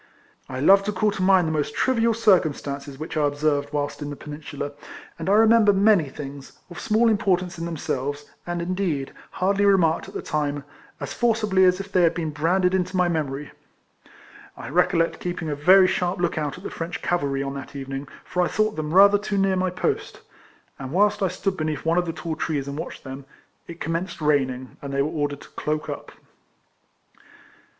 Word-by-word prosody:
I 130 - -5
love 195 +8 +6
to 210 - 0
call 210 +1 +1
to 195 - -5
mind 185 -2 +4
the - - -1
most 150 -2 -2
trivial 230 -3 +2
90 - - -7
KECOLLECTIONS - - -9
OF 210 - +8 0.2
circumstances 140 -1 -6
which 155 +3 -6
I 150 -2 +2
observed 145 0 0
whilst 145 0 -3
in 145 - -4
the 145 - -5
Peninsular, 145 -1 -7 0.5
and 165 +3 -3
I - - +4
remember 220 -1 +6
many 195 -6 +4
things, 140 0 -9
of 175 - -8
small 225 +2 +2
importance 185 -5 +1
in 165 - -3
themselves, 145 -3 -3 0.2
and, 175 0 -2
in 180 +2 -2
deed, 165 -8 -2 0.2
hardly 200 +2 0
remarked 180 -5 +3
at - - -12
the - - -4
time, 145 -2 -2 0.4
as - - -5
forci 225 -2 +1
bly 190 -2 +3
as 185 0 +5
if 195 0 -7
they 185 - +3
had 170 -2 +3
been 160 -2 -2
branded 180 +5 +1
into 185 0 0
my 180 -1 +3
memory. 150 -3 -3 1.1
I - - -7
recollect 165 0 +2
keeping 175 -3 -4
a 145 - -1
very 185 +6 +6
sharp 180 0 0
look 175 -1 0
out 150 0 -3
at 180 - -13
the - - -6
French 165 +1 -5
cavalry 140 -6 0
on 135 0 -4
that 140 0 -8
evening, 135 0 -5 0.2
for 180 - -1
I 175 - +2
thought 215 0 0
them 155 +2 -3
rather 200 +1 +7
too 205 0 -3
near 195 -1 +2
my 185 0 +1
post; 180 - -3 0.6
and 135 -1 -6
whilst 205 +5 +2
I 190 - +3
stood 185 +2 -2
beneath 155 -2 -3
one 165 +2 +3
of 175 - -2
the - - -1
tall 165 -1 -4
trees 145 -4 -2
and 140 - -5
watched 155 - -7
them, 135 0 -8 0.4
it 170 0 -9
com 165 - -2
menced 170 +1 -3
raining, 130 -4 0
and 140 - -6
they 140 0 +1
were 150 - -1
ordered 145 -2 -2
to - - -14
cloak 150 0 -3
up. - - -6
165 Hz, 210 wpm, -24 LUFS, 145-190 Hz, 1.1 s, OF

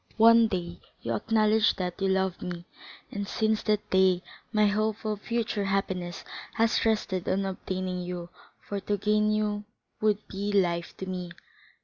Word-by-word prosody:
One 230 0 +7
day 175 -4 -4 0.2
you 115 - -1
acknowledged 215 - +3
that 180 +1 -3
you 195 - +2
loved 190 -1 +1
me, 175 -1 -5 0.5
and 205 -1 -3
since 220 +1 +1
that 210 -1 0
day 185 -1 +4 0.3
my 215 -1 +4
hope 215 +1 0
of 210 -1 -2
future 230 -3 -1
happiness 190 -3 -1 0.3
has 225 0 +2
rested 200 -4 0
on 195 +1 +1
obtaining 185 -1 -3
you, 175 -1 -5 0.4
for 200 - -2
to 205 +1 -1
gain 210 +1 +2
you 210 -1 0 0.4
would 210 -1 +1
be 200 +1 -3
life 170 -3 +1
to 190 - -5
me. 180 -1 -4
200 Hz, 155 wpm, -28 LUFS, 185-215 Hz, 0.5 s, One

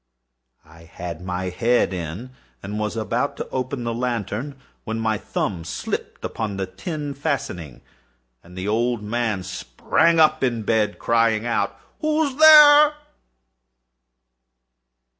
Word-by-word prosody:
I 80 +1 -17
had 85 0 -8
my 90 0 -3
head 115 +3 +1
in, 90 +8 -6 0.3
and 105 +2 -5
was 105 +1 -3
about 115 +6 -2
to - - -5
open 130 0 -3
the 115 0 -2
lantern, 120 +2 -3 0.3
when 110 +1 -4
my 110 -2 0
thumb 90 -5 -3
slipped 85 - -5
upon 105 -3 -4
the 95 - -2
tin 145 - -6
fastening, 135 - -4 0.6
and 90 +2 -15
the 95 +2 -4
old 115 +1 0
man 110 -3 -2
sprang 95 - 0
up 155 -2 +4
in 120 -4 0
bed, 110 -1 0
crying 115 -1 +1
out—"Who's 265 - -2
there?" 300 -1 +8
115 Hz, 120 wpm, -22 LUFS, 95-135 Hz, 0.6 s, there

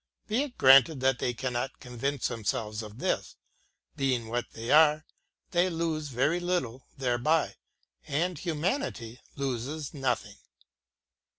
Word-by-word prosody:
Be 225 +5 +1
it 285 -4 -5
granted 135 +3 +7
that 130 -1 +2
they 125 - 0
cannot 125 +1 -3
convince 130 +2 -2
themselves 110 -1 -2
of 105 0 -10
this; - - -2 0.3
— - - -46
being 130 -5 0
what 120 +1 -1
they 115 +1 -4
are, 155 0 +6 0.5
they 180 +1 +3
lose 165 -3 -2
very 140 +6 +1
little 175 -9 -2
thereby, 130 +5 +1 0.5
and 175 +6 0
humanity 160 - -2 0.2
loses 140 +3 -3
nothing. 130 -6 -2
135 Hz, 125 wpm, -29 LUFS, 120-160 Hz, 0.5 s, granted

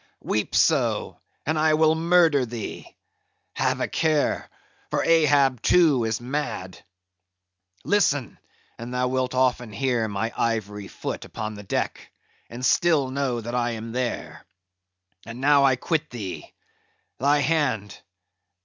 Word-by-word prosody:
"Weep - - -1
so, - - +1 0.3
and 155 +1 0
I 155 0 +4
will 155 0 +4
murder 165 -3 +3
thee! 120 -2 -7 0.6
have - - 0
a - - 0
care, 155 -3 0 0.4
for - - 0
Ahab 145 -6 +3
too 150 -9 +4
is 110 0 -1
mad. 120 -8 -4 1.0
Listen, 145 - +1 0.4
and 120 +1 -7
thou 125 0 0
wilt 130 0 -1
often 125 -3 +1
hear 120 +1 0
my 110 +2 -3
ivory 105 -3 -2
foot - - -6
upon 110 0 -6
the 105 - -9
deck, 100 - -3 0.4
and 125 +2 -5
still 150 -6 +3
know 130 -3 -1
that 120 +2 -6
I 120 -1 0
am 115 0 -6
there. 125 0 -4 0.8
And 115 +2 -9
now 140 +1 +4
I 135 -1 +4
quit 155 +4 -2
thee. 105 -7 -7 0.7
Thy 145 +2 +3
hand! 130 -9 0
130 Hz, 130 wpm, -24 LUFS, 115-150 Hz, 1.0 s, I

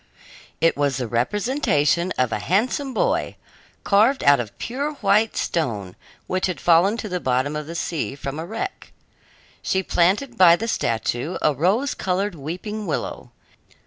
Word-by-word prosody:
It 165 - +3
was 140 -3 0
the 125 - -3
representation 170 - +1
of 125 -1 +1
a - - -1
handsome 240 - 0
boy, - - 0 0.5
carved 220 +7 +3
out 140 -1 +6
of 115 -3 -6
pure 280 +5 -3
white 215 -3 +2
stone, 105 - -2 0.3
which 185 +1 -1
had 185 - -4
fallen 175 +6 +4
to 225 - -5
the 180 -2 -2
bottom 130 +1 0
of 150 -1 -4
the 165 - -7
sea 165 -4 -3
from 140 +1 -5
a 160 - -4
wreck. 380 - -6 0.7
She 190 0 0
planted 210 +10 +1
by 170 -2 +8
the 225 +6 -4
statue 120 - -1
a 150 - +4
rose 195 - +1
colored 190 +2 -1
weeping 180 +8 -6
willow. 155 - -4
180 Hz, 155 wpm, -22 LUFS, 145-215 Hz, 0.7 s, by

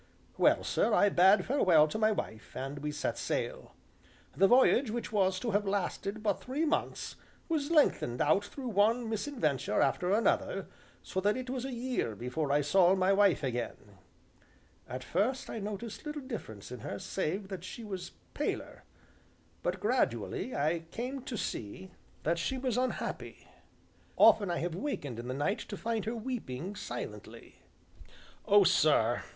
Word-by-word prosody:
Well, - - +4
sir, - - +2
I 205 - +5
bade 190 +1 +5
farewell 180 - +5
to 215 - -3
my 215 0 +4
wife, 110 - -5
and 135 +2 -4
we 150 +1 -3
set 150 0 -3
sail. - - -3 0.6
The 195 - +5
voyage, 255 +1 +5
which 230 0 -4
was 190 -3 +2
to 235 - -1
have 205 0 +1
lasted 200 +2 -2
but 205 -3 0
three 280 +6 -1
months, 325 +2 -2 0.3
was 310 -3 -1
lengthened 290 - +3
out 155 +7 +3
through 265 -3 -6
one 225 +3 +2
misadventure 205 - -1
after 180 +1 +2
another, 220 +3 +1 0.4
so 190 - -3
that 205 +4 +2
it 255 -1 -5
was 260 -1 -3
a 270 - -4
year 245 - -2
before 125 +6 -2
I 145 +1 +3
saw 180 +5 +4
my 190 +1 +3
wife 195 -6 +4
again, 115 -6 -4 0.9
At 130 +1 -5
first 215 - -1
I 225 - -4
noticed 210 +2 -6
little 300 -1 -5
difference 115 - -7
in 125 - -6
her 100 - -5
save 190 - -3
that 190 -3 -6
she 230 +5 -8
was 190 -4 -6 0.2
paler, - - -3 0.8
but, - - -2
gradually, 255 - 0
I 155 +4 +1
came 255 +7 -4
to 235 - -4
see 180 - -5 0.3
that 170 +2 +1
she 260 +10 -1
was 255 -3 -1
unhappy. 255 +1 -3 0.7
Often 205 -4 +6
I 170 - 0
have 170 0 -2
wakened 160 - -4
in 120 - -6
the 130 - -3
night 185 +9 0
to 205 - -7
find 225 -1 -2
her 225 +2 -2
weeping 210 - -5
silently. - - -8 0.9
"Oh, 205 -1 +7
sir!" 155 - +3
195 Hz, 160 wpm, -31 LUFS, 155-235 Hz, 0.9 s, Oh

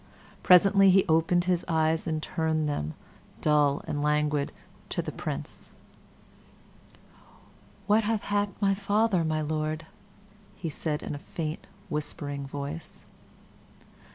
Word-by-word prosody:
Presently 195 +2 +6
he 190 +1 +5
opened 165 +2 +3
his 180 -1 +1
eyes 160 0 +1
and 155 -1 -2
turned 160 -3 0
them, 80 - -3 0.4
dull 150 -2 +2
and 145 - -2
languid, 150 -1 +1 0.4
to - - -3
the - - -2
Prince. - - -6 2.1
"What 215 +1 +3
hath 215 -1 0
happed 205 0 -1
my 195 -1 +3
father, 200 -1 +1
my 155 -1 0
Lord?" 155 +1 -2 0.8
said 150 0 -3
he, - - -8
in - - -4
a 145 - -5
faint, 155 +1 -5 0.2
whispering 145 -2 -4
voice. 145 +3 -7
160 Hz, 120 wpm, -28 LUFS, 150-185 Hz, 2.1 s, Presently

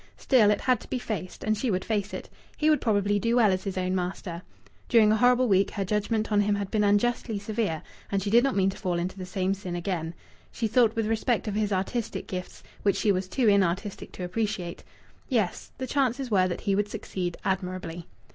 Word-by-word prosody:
Still, 235 -6 +4
it 210 - +2
had 255 -1 +2
to - - -14
be - - -1
faced, 210 -6 -5
and 215 0 +1
she 245 +4 -1
would 185 -2 -1
face 205 -2 -1
it. - - -6 0.3
He 310 0 +3
would 305 - +2
probably 205 -2 +2
do 230 +2 +1
well 225 -5 +5
as 185 +1 -2
his 195 -1 -3
own 185 0 0
master. 180 -1 -3 0.5
During 220 -3 +6
a - - +4
whole - - -1
horrible 250 0 +4
week 195 -2 +3
her 195 - -2
judgment 215 +2 -1
on 205 -1 +4
him 205 0 +2
had 200 -1 -4
been 215 -1 +2
unjustly 215 +2 +1
severe, 205 -5 -2 0.3
and 195 -1 0
she 200 - -2
did 235 +2 +6
not 275 -1 +1
mean 195 -1 +3
to - - -11
fall 180 -2 -1
into 180 +2 -2
the 185 - -6
same 185 +1 0
sin 185 -3 -5
again. 170 -2 -3 0.4
She 230 - -1
thought 225 0 +3
with 225 -1 0
respect 225 +1 0
of 210 - -1
his 210 0 0
artistic 200 +5 -2
gifts, 180 -1 -6 0.2
which 200 - +2
she 210 - +3
was 185 -1 -1
too 240 +5 +1
inartistic 200 0 +1
to 185 - -6
appreciate. 185 -2 -3 0.5
Yes, 220 -9 -1
the 260 - -3
chances 260 -1 0
were 185 -3 +4
that 175 - -4
he 200 - 0
would 205 +1 +1
succeed 180 -4 -4
admirably. 180 -3 -3
205 Hz, 225 wpm, -27 LUFS, 185-225 Hz, 0.5 s, During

